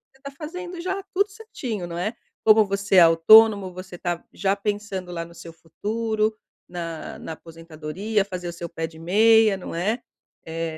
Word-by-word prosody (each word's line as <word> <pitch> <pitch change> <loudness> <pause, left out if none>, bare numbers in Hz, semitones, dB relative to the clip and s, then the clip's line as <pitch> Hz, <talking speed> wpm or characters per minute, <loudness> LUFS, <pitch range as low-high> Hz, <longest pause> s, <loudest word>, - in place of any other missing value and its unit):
você 270 - -26
tá 280 - -7
fazendo 350 +4 -7
já 380 +2 -2
tudo 400 +2 +2
certinho, 290 - -6
não 170 0 -6
é? 210 +7 -2 0.3
Como 215 0 +6
você 200 0 -1
é - - +9
autônomo, 195 +4 +7
você 185 0 -9
está 175 -1 -3
já 195 0 0
pensando 200 -3 -4
lá 170 -1 -4
no 170 0 -13
seu 165 0 -11
futuro, 215 +6 -2 0.3
na 170 -2 -6
na 160 - -6
aposentadoria, 165 +6 -4
fazer 180 -3 -6
o - - -6
seu 170 0 -6
pé 165 0 -4
de 160 0 -14
meia, 215 +4 +5
não 190 - -8
é? 210 +8 -1 0.4
Eh, 165 0 -4
195 Hz, 180 wpm, -24 LUFS, 170-220 Hz, 0.4 s, é